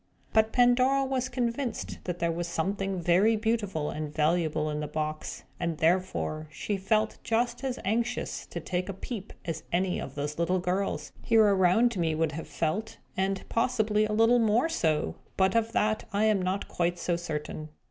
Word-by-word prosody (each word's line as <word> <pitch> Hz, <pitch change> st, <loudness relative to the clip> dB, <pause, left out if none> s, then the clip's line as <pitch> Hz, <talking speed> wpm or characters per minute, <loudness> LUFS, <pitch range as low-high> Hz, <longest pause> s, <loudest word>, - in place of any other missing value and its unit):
But 220 Hz, 0 st, +4 dB
Pandora 255 Hz, +2 st, +4 dB
was 260 Hz, -1 st, -1 dB
convinced 240 Hz, 0 st, -2 dB
that 180 Hz, -1 st, -2 dB
there 170 Hz, -1 st, 0 dB
was 170 Hz, +1 st, -3 dB
something 195 Hz, +3 st, -1 dB
very 180 Hz, +6 st, +4 dB
beautiful 210 Hz, -8 st, -1 dB
and 150 Hz, -1 st, -4 dB
valuable 155 Hz, 0 st, +1 dB
in 150 Hz, -, -2 dB
the 150 Hz, -, -3 dB
box; 155 Hz, 0 st, -4 dB, 0.2 s
and 170 Hz, -2 st, -1 dB
therefore 165 Hz, -2 st, 0 dB
she 155 Hz, +7 st, -3 dB
felt 215 Hz, +3 st, 0 dB
just 235 Hz, +3 st, 0 dB
as 260 Hz, -2 st, -2 dB
anxious 230 Hz, +4 st, -1 dB
to 170 Hz, -, -5 dB
take 180 Hz, +3 st, -3 dB
a -, -, -2 dB
peep 205 Hz, 0 st, -6 dB
as 165 Hz, -2 st, -3 dB
any 180 Hz, +1 st, +1 dB
of 135 Hz, -, -7 dB
these 150 Hz, +2 st, -3 dB
little 180 Hz, +2 st, +2 dB
girls, 185 Hz, +2 st, -1 dB
here 225 Hz, -1 st, +5 dB
around 200 Hz, +4 st, +4 dB
me, 160 Hz, -2 st, +1 dB
would 160 Hz, +1 st, +1 dB
have 160 Hz, -, -6 dB
felt. 190 Hz, +8 st, -2 dB, 0.2 s
And, 190 Hz, 0 st, -1 dB
possibly, 220 Hz, -3 st, +2 dB
a 215 Hz, -, -3 dB
little 225 Hz, +3 st, +5 dB
more 230 Hz, +7 st, +3 dB
so; 155 Hz, -, 0 dB, 0.2 s
but 190 Hz, 0 st, +3 dB
of 230 Hz, 0 st, +1 dB
that 215 Hz, +1 st, +1 dB
I 205 Hz, +1 st, +1 dB
am 215 Hz, -3 st, +3 dB
not 185 Hz, +2 st, -1 dB
quite 175 Hz, 0 st, 0 dB
so 175 Hz, 0 st, 0 dB
certain. 155 Hz, -2 st, -5 dB
190 Hz, 180 wpm, -28 LUFS, 165-225 Hz, 0.2 s, here